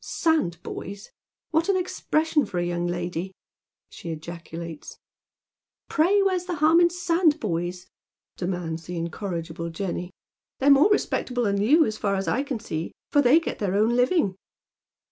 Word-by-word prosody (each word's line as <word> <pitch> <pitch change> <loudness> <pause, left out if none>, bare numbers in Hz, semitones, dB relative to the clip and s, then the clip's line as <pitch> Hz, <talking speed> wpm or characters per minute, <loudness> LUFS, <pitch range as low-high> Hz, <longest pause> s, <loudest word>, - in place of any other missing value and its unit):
" - - -19
Sandboys 200 - -2 0.4
I 315 - +5
\Vliat 335 - -3
an 390 - +3
expression 320 -4 0
for 185 - -5
a 175 - +1
young 175 0 -1
lady! 175 +1 -3 0.3
" - - -65
she 170 - -8
ejaculates. 165 0 -7 0.5
" - - -57
Pray 385 +6 +4
where's 370 -2 +1
the 360 -2 -3
harm 310 +2 +5
in 345 - +7
sandboys? 295 - 0 0.3
" - - -68
demands 175 -3 -3
the 175 +1 -5
incorri 170 +1 -3
gible 165 +1 -6
Jenny. 180 0 -4 0.3
" - - -68
They're 280 +2 +5
more 285 +8 +6
respectable 250 -11 0
than 200 -2 +1
you, 300 +9 +5
as 215 0 -4
far 200 -1 0
as 195 0 -2
I 255 - +1
can 275 -4 -3
see, 160 -6 -4 0.2
for 290 - +5
they 275 +4 +6
get 330 - -5
their 195 -2 -1
own 220 +4 +3
living." 245 - +2
205 Hz, 175 wpm, -25 LUFS, -, 0.5 s, in